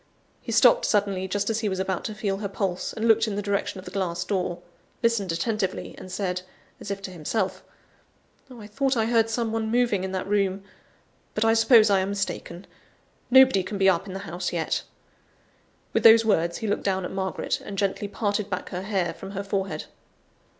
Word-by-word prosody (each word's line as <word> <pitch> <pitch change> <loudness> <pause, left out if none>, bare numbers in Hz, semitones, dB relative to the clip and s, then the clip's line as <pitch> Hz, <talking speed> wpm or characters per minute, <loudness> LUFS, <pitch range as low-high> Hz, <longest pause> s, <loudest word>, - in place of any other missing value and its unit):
He - - -6
stopped - - +5
suddenly, 200 -3 +1
just 205 +3 -1
as 220 - -1
he 215 -2 -1
was 190 -1 -3
about 190 -1 -2
to 215 - -4
feel 200 -2 -2
her 205 0 -3
pulse, 195 -2 -2
and 225 +1 -2
looked 225 0 +4
in 210 - -2
the 205 - -1
direction 200 -1 -1
of 185 - -9
the - - -8
glass 180 -3 -2
door 180 -3 -2 0.5
listened 225 -6 +1
attentively 190 +2 -2
and 185 - -10
said, 180 -1 -2 0.4
as - - -8
if 200 0 -4
to 190 - -6
himself 185 +4 -2 0.9
"I 235 -5 -11
thought 260 +5 0
I 220 - +2
heard 225 -1 +2
some 225 0 -1
one 220 0 -1
moving 235 -5 +1
in 190 - -3
that 185 - -2
room, 195 -1 0 0.7
but 215 - +1
I 225 - +5
suppose 225 -1 +6
I 195 - +4
am 190 +1 -1
mistaken; 195 -2 -4 0.6
nobody 260 -5 +7
can 200 +3 -5
be 195 0 +3
up 185 +1 +1
in 190 - -7
the 195 - -5
house 180 +2 -3
yet." 165 -2 -1 1.1
With - - +2
those 225 0 +8
words 170 -5 +1
he 225 - -4
looked 205 - 0
down 190 -2 0
at - - -5
Margaret, 190 -1 -2
and 200 - -7
gently 200 0 -1
parted 205 0 -2
back 185 -2 -4
her 180 - -4
hair 190 -4 -1
from 195 +3 -9
her 200 0 -3
forehead. 195 -1 -3
200 Hz, 205 wpm, -25 LUFS, 190-220 Hz, 1.1 s, those